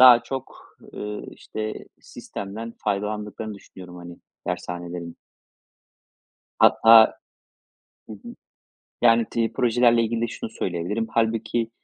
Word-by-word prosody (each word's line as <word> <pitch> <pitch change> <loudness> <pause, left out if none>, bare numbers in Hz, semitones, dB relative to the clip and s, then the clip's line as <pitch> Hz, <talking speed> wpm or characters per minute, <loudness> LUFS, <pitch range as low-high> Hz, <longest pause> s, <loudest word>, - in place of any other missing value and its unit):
daha 125 -2 +9
çok, 135 -1 -8 0.2
ııı, 105 0 -5
işte, 110 0 -6 0.3
sistemden 110 +4 -7
faydalandıklarını 105 +1 -3
düşünüyorum, 90 -2 -12
hani, 85 0 -10 0.3
dershanelerin. 85 -1 -5 1.4
Hatta 110 0 +7 0.9
hı - - -7
hı. 105 - -10 0.7
Yani 115 -1 +5
tri 115 -1 0
projelerle 120 -1 +3
ilgili 115 +1 -1
de 120 - +1
şunu 115 - -6
söyleyebilirim. 100 +3 -3
Halbuki 115 0 0
110 Hz, 100 wpm, -24 LUFS, 100-115 Hz, 1.4 s, daha